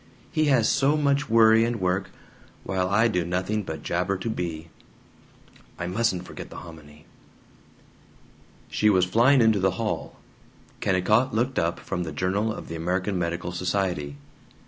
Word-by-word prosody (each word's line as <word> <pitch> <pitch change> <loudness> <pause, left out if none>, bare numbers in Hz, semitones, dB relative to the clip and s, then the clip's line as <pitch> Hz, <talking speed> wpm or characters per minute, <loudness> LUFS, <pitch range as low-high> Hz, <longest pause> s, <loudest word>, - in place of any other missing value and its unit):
He 155 - +1
has 130 -6 +3
so 145 +3 +2
much 140 -2 +1
worry 110 0 +6
and 115 0 -1
work, 95 +1 -1 0.5
while 95 -1 -1
I 110 +4 +4
do 90 -6 0
nothing 95 +5 -1
but 80 -6 -7
jabber 90 +3 -1
to 110 +4 -3
Bea. 85 -5 -5 1.1
"I 85 - -4
MUSTN'T 95 0 0
forget - - -9
the - - -12
hominy 80 -2 -12 0.9
" - - -29
She 105 - +3
was 95 -3 +4
flying 120 +8 +4
into 110 -3 +4
the 95 -1 +1
hall. - - -3 0.6
Kennicott 105 +6 +2
looked 125 +4 0
up 85 +1 -1
from 90 - -4
the 85 -2 -4
Journal 95 +8 -1
of - - -7
the 80 - -6
American 90 +3 -1
Medical 85 +1 -3
Society. 90 -5 -2
95 Hz, 155 wpm, -25 LUFS, 90-110 Hz, 1.1 s, worry